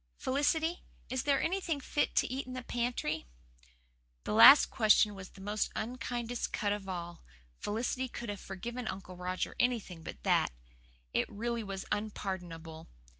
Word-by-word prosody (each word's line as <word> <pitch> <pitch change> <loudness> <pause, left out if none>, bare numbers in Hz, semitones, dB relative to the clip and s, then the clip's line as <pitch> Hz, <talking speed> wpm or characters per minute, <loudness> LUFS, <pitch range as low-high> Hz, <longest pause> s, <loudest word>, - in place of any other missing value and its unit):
Felicity, 320 +5 +1 0.3
is 260 -1 0
there 280 -1 +2
anything 340 -4 0
fit 290 +2 -1
to - - +4
eat 260 +1 -4
in 255 - -6
the 255 -1 -5
pantry?" 235 -12 -2 1.0
That - - -3
last 275 - +9
question 215 -2 +5
was 190 -1 -9
the 195 - -14
most 210 +2 -1
unkindest 240 0 -3
cut 205 -1 0
of 200 -2 -5
all. 175 -2 -5 0.4
Felicity 245 +4 -1
could 235 -2 -6
have 205 -1 -4
forgiven 240 +6 -5
Uncle 190 -1 -6
Roger 180 +1 -3
anything 225 -9 0
but 70 - -9
that. - - +3 0.6
It - - +1
really 235 +2 -2
was 195 -2 -5
unpardonable. 175 -6 -4
215 Hz, 150 wpm, -32 LUFS, 190-250 Hz, 1.0 s, last